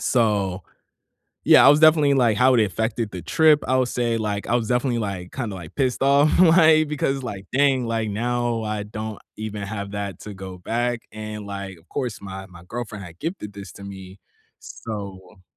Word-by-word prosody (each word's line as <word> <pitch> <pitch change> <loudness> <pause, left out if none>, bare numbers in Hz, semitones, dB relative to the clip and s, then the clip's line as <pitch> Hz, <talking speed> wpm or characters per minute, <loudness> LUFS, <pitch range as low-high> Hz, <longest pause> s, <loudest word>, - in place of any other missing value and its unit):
So, 100 -7 +1 0.8
yeah, - - +7
I - - +10
was 145 +2 +6
definitely, 155 -3 +6
like, 120 -5 +3
how 130 +4 +5
it 115 - +5
affected 110 +1 -2
the 90 -2 -7
trip, 155 -2 +4
I 130 - +3
would 130 -1 +2
say, 120 -2 0
like, 105 -2 -3
I 120 - 0
was 115 -3 0
definitely, 125 -1 +1
like, 95 -4 -4
kinda, 115 -7 -4
like, 85 -4 -10
pissed 130 -2 0
off, 140 +2 +4
like, 160 -3 +6
because, 140 -2 -1
like, 100 -6 -6
dang. 135 -2 +3
Like, 115 -1 -1
now 120 +1 -1
I 105 -1 -3
don't 110 0 -6 0.2
even 105 -1 -5
have 100 0 -5
that 100 -1 -5
to 105 -1 -8
go 95 -1 -9
back. 120 +5 -2
And, 105 -1 -7
like, 100 -3 -6
of 80 - -26
course, 125 -8 -4
my 95 -1 -8
my 90 -2 -15
girlfriend 110 -3 -6
had 85 -1 -12
gifted 165 - -5
this 100 0 -10
to 100 - -11
me. 95 -1 -10 0.4
So 100 -3 -8
110 Hz, 195 wpm, -23 LUFS, 100-125 Hz, 0.8 s, I